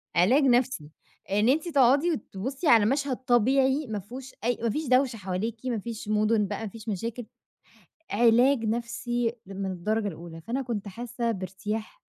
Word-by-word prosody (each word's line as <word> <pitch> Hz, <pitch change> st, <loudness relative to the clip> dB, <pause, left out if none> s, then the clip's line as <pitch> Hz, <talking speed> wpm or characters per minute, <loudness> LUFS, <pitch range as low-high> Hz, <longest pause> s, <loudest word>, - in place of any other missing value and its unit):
علاج 235 Hz, -, +4 dB
نَفسي، 245 Hz, -, +2 dB, 0.4 s
إن 210 Hz, +4 st, +3 dB
أنتِ 310 Hz, +6 st, +2 dB
تقعدي 280 Hz, +3 st, +4 dB
وتبصّي 265 Hz, -, -4 dB
على 225 Hz, -6 st, +6 dB
مشهد 270 Hz, +2 st, 0 dB
طبيعي 265 Hz, +3 st, +2 dB
ما 215 Hz, -2 st, -3 dB
فيهوش 255 Hz, +7 st, -9 dB
أي 240 Hz, +1 st, +1 dB
ما 230 Hz, -, +2 dB
فيش 305 Hz, +7 st, -2 dB
دوشة 255 Hz, -1 st, +3 dB
حواليكِ، 210 Hz, +5 st, -4 dB
ما 240 Hz, -4 st, -1 dB
فيش 220 Hz, 0 st, -7 dB
مدن 215 Hz, 0 st, +2 dB
بقى، -, -, -4 dB
ما -, -, -3 dB
فيش 220 Hz, +2 st, -9 dB
مشاكل، 230 Hz, +4 st, -4 dB, 0.9 s
علاج 240 Hz, +3 st, +4 dB
نَفسي 235 Hz, +1 st, -1 dB
من 195 Hz, 0 st, -4 dB
الدرجة 210 Hz, +4 st, -1 dB
الأولى، 165 Hz, -2 st, -9 dB
فأنا 240 Hz, +11 st, -3 dB
كنت 225 Hz, -5 st, -4 dB
حاسّة 235 Hz, +3 st, -3 dB
بارتياح 210 Hz, -, -5 dB
230 Hz, 160 wpm, -27 LUFS, 210-255 Hz, 0.9 s, على